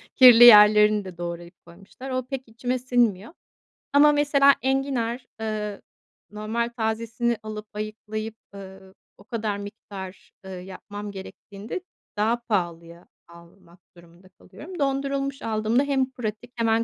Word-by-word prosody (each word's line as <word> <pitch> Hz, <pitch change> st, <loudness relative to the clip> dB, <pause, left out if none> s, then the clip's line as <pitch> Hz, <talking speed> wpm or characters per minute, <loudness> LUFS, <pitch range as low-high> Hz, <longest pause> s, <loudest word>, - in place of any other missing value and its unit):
kirli 245 Hz, -3 st, +9 dB
yerlerini 210 Hz, -2 st, +8 dB
de 185 Hz, -2 st, -10 dB
doğrayıp 170 Hz, 0 st, -8 dB
koymuşlar. 195 Hz, +9 st, -12 dB
O 255 Hz, -1 st, -2 dB
pek 265 Hz, -1 st, -5 dB
içime 245 Hz, +3 st, -3 dB
sinmiyor 240 Hz, -, 0 dB, 0.6 s
Ama 295 Hz, +1 st, +6 dB
mesela 285 Hz, -1 st, +4 dB
enginar, 265 Hz, -3 st, -1 dB
eee, 215 Hz, -2 st, -4 dB, 0.5 s
normal 220 Hz, +3 st, -3 dB
tazesini 230 Hz, +1 st, -1 dB
alıp 215 Hz, 0 st, -7 dB
ayıklayıp, 215 Hz, +1 st, -6 dB, 0.2 s
ııı, 190 Hz, -1 st, -12 dB, 0.2 s
o -, -, -17 dB
kadar 215 Hz, -3 st, -3 dB
miktar, 200 Hz, -2 st, -10 dB
ııı, 190 Hz, -1 st, -7 dB
yapmam 205 Hz, +2 st, -9 dB
gerektiğinde 200 Hz, -, -8 dB, 0.4 s
daha 220 Hz, +3 st, +2 dB
pahalıya 170 Hz, -6 st, -4 dB, 0.2 s
almak 170 Hz, +1 st, -18 dB, 0.2 s
durumunda 170 Hz, +2 st, -19 dB
kalıyorum. 350 Hz, -, -12 dB
Dondurulmuş 275 Hz, 0 st, -2 dB
aldığımda 220 Hz, +3 st, 0 dB
hem 270 Hz, -2 st, 0 dB
pratik, 235 Hz, -1 st, -6 dB
hemen 230 Hz, -1 st, +1 dB
215 Hz, 120 wpm, -24 LUFS, 195-250 Hz, 0.6 s, kirli